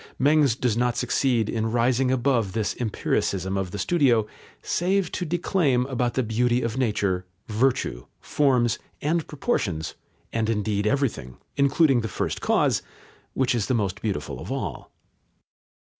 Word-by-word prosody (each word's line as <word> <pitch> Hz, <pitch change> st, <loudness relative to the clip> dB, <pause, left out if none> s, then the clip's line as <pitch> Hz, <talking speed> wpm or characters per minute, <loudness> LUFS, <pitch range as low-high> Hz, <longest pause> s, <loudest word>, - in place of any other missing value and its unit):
Mengs 145 Hz, -3 st, +4 dB
does 125 Hz, -4 st, +1 dB
not 125 Hz, 0 st, +1 dB
succeed 125 Hz, -2 st, +1 dB
in 110 Hz, 0 st, -1 dB
rising 125 Hz, +2 st, +2 dB
above 125 Hz, -6 st, +1 dB
this 110 Hz, -2 st, -1 dB
empiricism 100 Hz, -4 st, -1 dB
of 95 Hz, -2 st, -1 dB
the 100 Hz, -, -6 dB
studio, 125 Hz, -, +3 dB, 0.4 s
save 185 Hz, 0 st, 0 dB
to 180 Hz, -, -3 dB
declaim 160 Hz, -6 st, +1 dB
about 125 Hz, -2 st, -1 dB
the 130 Hz, -, +1 dB
beauty 120 Hz, +2 st, +1 dB
of 115 Hz, 0 st, -2 dB
nature, 105 Hz, -7 st, 0 dB, 0.2 s
virtue, 110 Hz, -, 0 dB
forms, 125 Hz, -5 st, +2 dB, 0.2 s
and 160 Hz, +2 st, 0 dB
proportions, 100 Hz, -, -2 dB, 0.4 s
and 115 Hz, -1 st, 0 dB
indeed 105 Hz, -1 st, 0 dB
everything, 110 Hz, -, -1 dB, 0.2 s
including 140 Hz, -2 st, +3 dB
the 110 Hz, -, -3 dB
First 95 Hz, -, -3 dB
Cause, -, -, +2 dB, 0.5 s
which 130 Hz, -2 st, +2 dB
is 115 Hz, -4 st, -1 dB
the 130 Hz, -, +1 dB
most 100 Hz, -3 st, -1 dB
beautiful 100 Hz, -9 st, -3 dB
of -, -, -7 dB
all. -, -, -4 dB
120 Hz, 145 wpm, -25 LUFS, 105-135 Hz, 0.5 s, Mengs